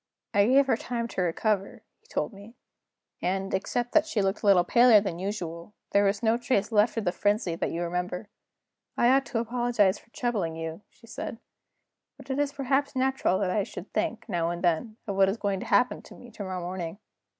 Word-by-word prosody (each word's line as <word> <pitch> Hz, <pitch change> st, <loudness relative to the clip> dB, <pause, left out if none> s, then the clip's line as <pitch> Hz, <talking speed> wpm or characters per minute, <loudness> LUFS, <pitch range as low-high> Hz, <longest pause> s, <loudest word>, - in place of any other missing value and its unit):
"I 200 Hz, +1 st, +4 dB
gave 270 Hz, +3 st, +5 dB
her 265 Hz, -, +2 dB
time 235 Hz, -1 st, -3 dB
to 190 Hz, -, -2 dB
recover," 195 Hz, +3 st, -1 dB, 0.2 s
he 450 Hz, -, -29 dB
told 470 Hz, -, -2 dB
me; 200 Hz, +4 st, -13 dB, 0.7 s
"and, 195 Hz, +2 st, -1 dB
except 240 Hz, +5 st, -1 dB
that 315 Hz, 0 st, +4 dB
she 280 Hz, -9 st, -1 dB
looked 195 Hz, 0 st, 0 dB
a -, -, -1 dB
little 190 Hz, -3 st, +6 dB
paler 235 Hz, +3 st, +6 dB
than 190 Hz, -4 st, -4 dB
usual, 180 Hz, -2 st, -5 dB, 0.2 s
there 200 Hz, -, +4 dB
was 200 Hz, +2 st, 0 dB
no 225 Hz, +1 st, +3 dB
trace 235 Hz, -3 st, 0 dB
left 215 Hz, +2 st, +3 dB
of 220 Hz, -, -1 dB
the 175 Hz, -, +2 dB
frenzy 205 Hz, -1 st, 0 dB
that 165 Hz, -, -2 dB
you 170 Hz, +1 st, -3 dB
remember. 180 Hz, +3 st, -3 dB, 0.7 s
'I 240 Hz, -, +4 dB
ought 270 Hz, +1 st, +4 dB
to 235 Hz, -, -3 dB
apologize 230 Hz, -4 st, +1 dB
for -, -, -25 dB
troubling 215 Hz, -10 st, -2 dB
you,' 165 Hz, +2 st, -5 dB
she 230 Hz, -, -20 dB
said; 230 Hz, 0 st, -6 dB, 0.8 s
'but -, -, -8 dB
it 265 Hz, -, -1 dB
is 290 Hz, -1 st, +1 dB
perhaps 280 Hz, 0 st, 0 dB
natural 265 Hz, -7 st, +1 dB
that 190 Hz, -2 st, 0 dB
I 205 Hz, -, +1 dB
should 190 Hz, -1 st, -8 dB
think, 220 Hz, +1 st, -2 dB
now 170 Hz, -1 st, 0 dB
and 175 Hz, +1 st, -4 dB
then, 180 Hz, +6 st, 0 dB
of 200 Hz, -, -3 dB
what 195 Hz, -1 st, +5 dB
is 200 Hz, -, -2 dB
to 200 Hz, -3 st, -2 dB
happen 250 Hz, 0 st, +2 dB
to -, -, -14 dB
me 245 Hz, -, -13 dB
to 210 Hz, -, -10 dB
morrow 185 Hz, -1 st, -4 dB
morning. 175 Hz, 0 st, -5 dB
205 Hz, 210 wpm, -27 LUFS, 185-240 Hz, 0.8 s, little